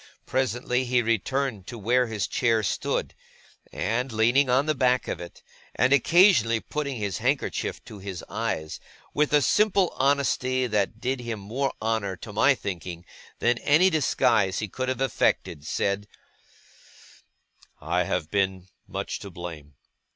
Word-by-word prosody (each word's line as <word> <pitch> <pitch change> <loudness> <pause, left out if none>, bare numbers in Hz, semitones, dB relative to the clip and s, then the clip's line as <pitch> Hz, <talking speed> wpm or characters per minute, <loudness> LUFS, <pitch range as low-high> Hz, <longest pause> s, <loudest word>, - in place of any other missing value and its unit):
Presently 125 -1 0
he 125 0 +2
returned 115 -1 -1
to 120 - -7
where 120 +4 +2
his 110 -3 -2
chair 115 -3 +1
stood; - - -1 0.6
and, 120 +5 -1
leaning 120 +5 +3
on 130 +3 +3
the 155 - +1
back 125 -3 +2
of 85 - -4
it, 85 0 -11 0.3
and 125 +3 +3
occasionally 140 - +5
putting 140 +2 -4
his 100 -5 -3
handkerchief - - -1
to 105 - -10
his 95 -3 -6
eyes, 80 0 -3 0.3
with 150 0 +1
a 150 -2 +4
simple 200 -1 +3
honesty 130 -2 +1
that 105 -1 -1
did 130 +2 -1
him 120 -3 -5
more 125 +8 -2
honour, 110 -4 -1
to 105 +3 -10
my 135 +6 +4
thinking, 90 -5 -6 0.3
than 120 0 +1
any 175 +6 +4
disguise 115 - +2
he 105 - -2
could 130 +6 -3
have 130 0 -2
effected, 95 - 0
said: 100 +1 -1 1.7
'I 85 +3 0
have 80 -1 -2
been 95 -2 -1 0.2
much - - -4
to 100 - -8
blame. 80 -5 -9
115 Hz, 145 wpm, -26 LUFS, 100-130 Hz, 1.7 s, occasionally